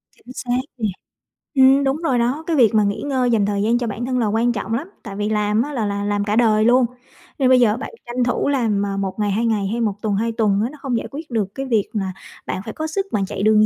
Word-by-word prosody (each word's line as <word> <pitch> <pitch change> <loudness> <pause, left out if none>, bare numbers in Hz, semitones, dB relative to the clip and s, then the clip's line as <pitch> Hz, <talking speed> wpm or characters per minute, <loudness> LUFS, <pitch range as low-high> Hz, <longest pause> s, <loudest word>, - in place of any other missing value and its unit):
Chính 250 - -14
xác 245 -1 -1 0.2
nè. 220 -3 0 0.7
Ừm, 270 +1 +6
đúng 270 +1 +1
rồi 270 -7 +1
đó, 250 +7 0
cái 335 - +1
việc 235 -5 +4
mà 215 - +5
nghỉ 200 0 -1
ngơi, 260 -4 0
dành 215 -3 +3
thời 200 0 -1
gian 225 +3 +2
cho 240 -1 -2
bản 230 +3 -4
thân 255 0 0
là 230 - +1
quan 225 +3 +2
trọng 225 0 -3
lắm. 280 +9 -2 0.2
Tại 200 -3 -7
vì 205 +1 -1
làm 210 0 +1
á 290 +4 -3
là 230 -5 -1
là 200 0 -2
làm 205 0 0
cả 210 0 0
đời 220 -2 +4
luôn, 245 +2 +5 0.5
nên 260 -2 +3
bây 255 -1 +6
giờ 225 -2 +3
bạn - - -6
tranh 240 +1 -1
thủ 245 +3 0
làm, 225 -7 +1
à, 195 -1 -3
1 195 +1 -3
ngày, 205 -1 +1
2 220 +4 0
ngày 215 -4 +1
hay 230 +4 -2
1 215 -3 +1
tuần, 210 -2 0
2 230 +3 0
tuần 210 -3 +1
á, 235 - -1
nó 300 - -12
không 255 -4 -1
giải - - -4
quyết 305 +3 -7
được 205 -4 -2
cái 270 - -3
việc 225 -6 +1
là 195 -3 -2 0.3
bạn 185 - -3
phải 220 - -6
có 315 - -3
sức 390 +5 -2
bạn 200 -2 0
chạy 195 - -4
đường 215 0 +5
225 Hz, 285 wpm, -21 LUFS, 205-255 Hz, 0.7 s, Ừm